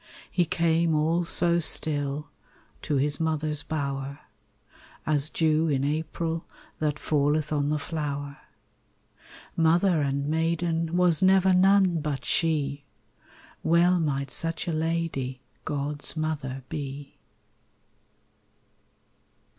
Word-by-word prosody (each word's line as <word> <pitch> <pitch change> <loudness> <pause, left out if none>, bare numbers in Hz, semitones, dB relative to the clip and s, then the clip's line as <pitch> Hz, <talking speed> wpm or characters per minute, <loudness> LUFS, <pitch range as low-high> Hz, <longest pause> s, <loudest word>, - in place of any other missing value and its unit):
He 175 - +2
came 165 0 +1
all 165 +3 +1
so 170 0 +3
still 150 -2 +1 0.5
To 150 - -2
His 145 +1 +1
mother's 155 -2 -1
bower, 140 -2 -4 0.8
As 150 -1 +2
dew 160 0 +1
in 140 -3 0
April 160 +2 -2 0.4
That 150 -1 0
falleth 150 +1 0
on 145 -1 0
the 150 - +1
flower. 145 -2 -4 1.2
Mother 170 +1 +3
and 140 0 -1
maiden 165 +1 0
Was 175 -3 +3
never 190 0 +5
none 190 -2 +4
but 145 -2 -3
she! 145 -4 0 0.8
Well 175 +2 +3
might 140 -4 -1
such 165 +1 -2
a 170 - -1
lady 155 -5 -2 0.3
God's 145 +1 -3
mother 145 -4 -3
be. 140 -2 -7
155 Hz, 105 wpm, -26 LUFS, 145-165 Hz, 1.2 s, never